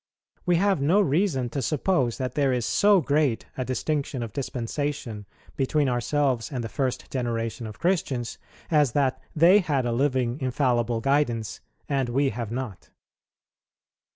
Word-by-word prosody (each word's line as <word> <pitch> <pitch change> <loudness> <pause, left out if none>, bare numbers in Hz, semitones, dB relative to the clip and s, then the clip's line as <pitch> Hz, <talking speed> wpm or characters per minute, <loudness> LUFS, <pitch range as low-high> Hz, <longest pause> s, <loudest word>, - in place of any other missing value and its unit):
We 175 - +4
have 195 -2 +2
no 165 +9 +4
reason 155 -7 +1
to 135 - -2
suppose 140 -3 0
that 130 -1 -3
there 140 -3 +2
is 125 -2 0
so 200 +8 +4
great 140 -5 +1
a 130 - -2
distinction 130 +1 -2
of 115 - -7
dispensation 125 -4 -4 0.3
between 145 +2 +1
ourselves 125 +1 0
and 125 -4 -3
the 115 - -4
first 130 -1 -2
generation 115 -2 -2
of 105 - -9
Christians, 150 -10 -1 0.3
as 150 -6 +3
that 135 -2 +1
they 170 +6 +6
had 145 -9 0
a 120 - 0
living 130 0 0
infallible 120 -3 +1
guidance, 120 -5 0 0.3
and 135 -3 0
we 135 +3 +2
have 115 -1 -5
not. 120 -6 -5
130 Hz, 150 wpm, -26 LUFS, 120-150 Hz, 0.3 s, they